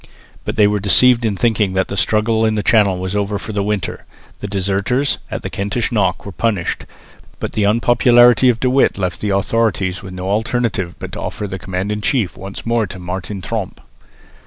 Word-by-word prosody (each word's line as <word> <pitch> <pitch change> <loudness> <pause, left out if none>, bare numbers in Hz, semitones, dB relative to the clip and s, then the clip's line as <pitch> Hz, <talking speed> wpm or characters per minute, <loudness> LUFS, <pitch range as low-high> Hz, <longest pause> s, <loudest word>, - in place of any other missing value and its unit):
But - - -3
they 105 - +5
were 105 0 +2
deceived 120 +5 +4
in 105 -3 0
thinking 110 -4 +1
that 95 0 +1
the - - -5
struggle 110 +2 +1
in 110 -1 +2
the 105 - -1
Channel 105 -5 +3
was 95 +2 -4
over 100 0 -1
for 110 - -6
the 100 - 0
winter. 105 -1 -3 0.3
The - - -5
deserters 100 +8 0
at - - -5
the - - -4
Kentish 105 +5 -2
Knock 95 -5 0
were 100 - -6
punished, 95 0 -2 0.5
but - - -4
the 105 - 0
unpopularity 120 +2 +5
of 115 -2 +1
De 130 - +1
With 130 -3 +3
left 90 -2 -3
the 105 - -1
authorities 100 -2 0
with 95 -3 -9
no 90 0 -5
alternative 110 -3 -1
but - - -7
to - - -6
offer 105 - -4
the 95 -1 -6
command 95 +3 -3
in 105 0 -2
chief 105 -4 0
once 95 +1 -8
more 115 -2 +1
to 95 - -9
Martin 95 +2 -5
Tromp. 110 -5 -4
105 Hz, 205 wpm, -18 LUFS, 95-115 Hz, 0.5 s, they